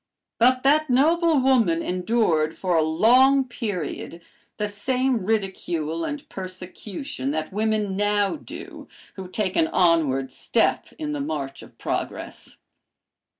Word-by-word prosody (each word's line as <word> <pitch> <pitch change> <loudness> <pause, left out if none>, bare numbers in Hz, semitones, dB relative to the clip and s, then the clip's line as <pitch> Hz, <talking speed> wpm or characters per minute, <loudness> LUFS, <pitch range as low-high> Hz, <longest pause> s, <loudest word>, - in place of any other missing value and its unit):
But 255 +2 +4
that 300 +2 +3
noble 320 +4 +3
woman 230 -11 +3
endured 180 -4 +1
for 180 -2 0
a 160 - +4
long 250 - +4
period 185 - -5 0.3
the 210 - -1
same 250 +3 0
ridicule 175 -6 -1
and 290 - -5
persecution 185 - -6
that 155 +4 -3
women 215 -2 0
now 205 +2 +1
do 300 - -10 0.3
who 190 -2 -7
take 185 0 -2
an 160 - +3
onward 155 -8 +2
step - - 0
in 305 -1 -4
the 295 -1 -3
march 140 - -4
of - - -15
progress. - - -5
205 Hz, 125 wpm, -24 LUFS, 170-255 Hz, 0.3 s, But